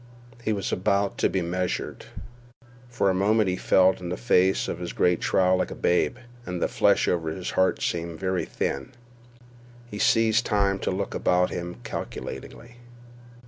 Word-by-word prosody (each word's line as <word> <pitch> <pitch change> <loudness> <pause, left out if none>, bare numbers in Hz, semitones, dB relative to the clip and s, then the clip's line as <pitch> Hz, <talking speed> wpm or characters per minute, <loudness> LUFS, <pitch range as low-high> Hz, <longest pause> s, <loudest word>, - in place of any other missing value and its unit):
He 110 - 0
was 100 -2 -2
about 100 +2 0
to - - +3
be 95 -2 -1
measured. 90 +1 -3 0.8
For 100 -5 +1
a - - 0
moment 105 +3 +2
he 90 - 0
felt 95 +1 +3
in 90 -1 -6
the 90 - -3
face 95 -5 +2
of - - -4
his 90 -1 -5
great 90 -1 +2
trial 95 -1 +3
like - - -1
a - - -7
babe, 90 +7 +1 0.3
and 90 -5 -4
the - - +1
flesh - - +2
over 80 -2 0
his 90 +3 -4
heart 95 - +1
seemed 85 -1 -3
very 95 -1 -1
thin. 90 - -3 0.9
He 105 -3 -8
seized 115 +1 +3
time 100 -3 +1
to - - -2
look 95 +1 -3
about 90 0 +2
him 85 0 -5
calculatingly. 120 0 -7
95 Hz, 170 wpm, -25 LUFS, 90-100 Hz, 0.9 s, to